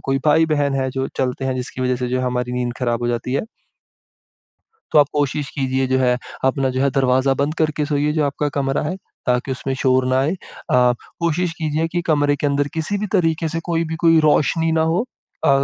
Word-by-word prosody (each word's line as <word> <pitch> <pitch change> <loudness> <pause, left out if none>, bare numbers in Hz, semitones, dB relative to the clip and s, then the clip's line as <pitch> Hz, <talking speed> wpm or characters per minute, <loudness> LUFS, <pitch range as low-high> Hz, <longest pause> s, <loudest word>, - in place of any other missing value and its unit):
कोई 135 0 +1
भाई-बहन 150 -2 +3
है 130 -1 0
जो 130 +1 -2
चलते 130 0 -1
हैं 130 -1 0
जिसकी 125 0 -4
वजह 125 0 +1
से 125 0 -3
जो 130 +1 0
हमारी 125 -1 -2
नींद 125 -1 -1
ख़राब 120 -2 0
हो 120 - 0
जाती 120 +1 -2
है। 140 - 0 1.5
तो 150 - +6
आप 145 - +6
कोशिश 145 -1 -1
कीजिए, 130 -2 0
जो 130 0 +1
है, 125 -1 +3 0.3
अपना 135 0 +2
जो 130 +1 -1
है, 140 - +3
दरवाज़ा 130 0 +2
बंद 140 +3 -1
करके 155 -1 +1
सोइए, 150 0 +1
जो 155 -1 +1
आपका 145 +1 -1
कमरा 135 0 0
है, 155 +5 -3 0.3
ताकि 125 +2 +1
उसमें 135 +1 -3
शोर 130 -1 +3
ना 130 0 +2
आए। 150 +6 +1 0.4
अ, 125 -1 +5 0.3
कोशिश 170 +1 0
कीजिए 155 0 0
कि 175 0 0
कमरे 145 -1 +3
के 145 - -1
अंदर 140 0 +1
किसी 165 +6 -1
भी 210 - -2
तरीके 165 -4 +1
से 165 +1 -2
कोई 165 0 +1
भी 160 0 -4
कोई 165 -1 +6
रोशनी 160 +2 +2
ना 160 0 +2
हो। 185 +8 +1 0.4
अ, - - +6
140 Hz, 215 wpm, -20 LUFS, 130-155 Hz, 1.5 s, तो